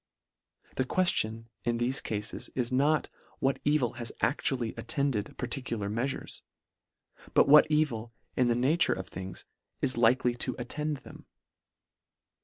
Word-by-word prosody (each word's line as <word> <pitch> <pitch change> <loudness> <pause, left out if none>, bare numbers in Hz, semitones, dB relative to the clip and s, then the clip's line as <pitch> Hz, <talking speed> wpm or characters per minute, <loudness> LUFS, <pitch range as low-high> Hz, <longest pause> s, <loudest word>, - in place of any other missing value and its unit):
The 130 - +3
queftion 115 -8 +1 0.2
in 120 0 0
thefe 125 +3 0
cafes 105 0 -3
is 125 -1 0
not, 145 +4 +2 0.3
what 135 0 0
evil 145 -5 +2
has 115 - -2
actually 120 -1 0
attended 140 -9 -2
parti 125 +2 -1
cular 105 -5 -3
meafures 130 +4 -2 0.5
— - - -25
but - - +6
what 150 +2 +8
evil, 135 -7 0 0.2
in 125 - +3
the 120 - +3
nature 140 +8 +3
of 95 - -6
things, 95 +1 -7 0.3
is 130 -3 +1
likely 120 +1 +4
to 125 +1 -2
attend 150 +4 -3
them. - - -13
125 Hz, 140 wpm, -30 LUFS, 115-140 Hz, 0.5 s, what